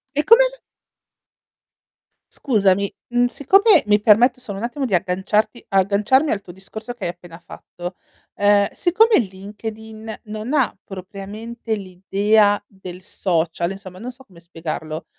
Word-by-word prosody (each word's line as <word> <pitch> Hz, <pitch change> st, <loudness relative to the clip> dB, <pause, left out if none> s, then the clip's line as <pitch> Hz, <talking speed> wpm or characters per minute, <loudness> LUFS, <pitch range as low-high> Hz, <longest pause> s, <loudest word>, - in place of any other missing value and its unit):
E 295 Hz, -, +2 dB
come? 475 Hz, +7 st, +6 dB, 1.8 s
Scusami, 200 Hz, -6 st, +1 dB, 0.2 s
uhm, 245 Hz, 0 st, +3 dB
siccome 390 Hz, -, +4 dB
mi 210 Hz, 0 st, +3 dB
permetto 245 Hz, +4 st, +4 dB
solo 205 Hz, -6 st, -7 dB
un 230 Hz, -, -3 dB
attimo 270 Hz, +4 st, -4 dB
di 210 Hz, -, -3 dB
agganciarti 190 Hz, +6 st, 0 dB
agganciarmi 205 Hz, +9 st, +2 dB
al 205 Hz, -, -1 dB
tuo 180 Hz, -, -12 dB
discorso 215 Hz, +6 st, -9 dB
che 235 Hz, -5 st, -7 dB
hai -, -, -1 dB
appena 175 Hz, -1 st, -14 dB
fatto, 175 Hz, +2 st, -9 dB, 0.4 s
ehm, 205 Hz, 0 st, +4 dB
siccome 435 Hz, +6 st, +3 dB
LinkedIn 220 Hz, +2 st, -7 dB
non 215 Hz, +4 st, -6 dB
ha 265 Hz, -7 st, +2 dB
propriamente 210 Hz, +4 st, -6 dB
l'idea 205 Hz, +2 st, +1 dB
del 185 Hz, -2 st, -11 dB
social, 170 Hz, -1 st, -1 dB
insomma 190 Hz, -2 st, -10 dB
non 245 Hz, +3 st, -6 dB
so 265 Hz, +2 st, -18 dB
come 175 Hz, -6 st, -18 dB
spiegarlo, 160 Hz, -2 st, -6 dB
205 Hz, 135 wpm, -21 LUFS, 190-235 Hz, 1.8 s, come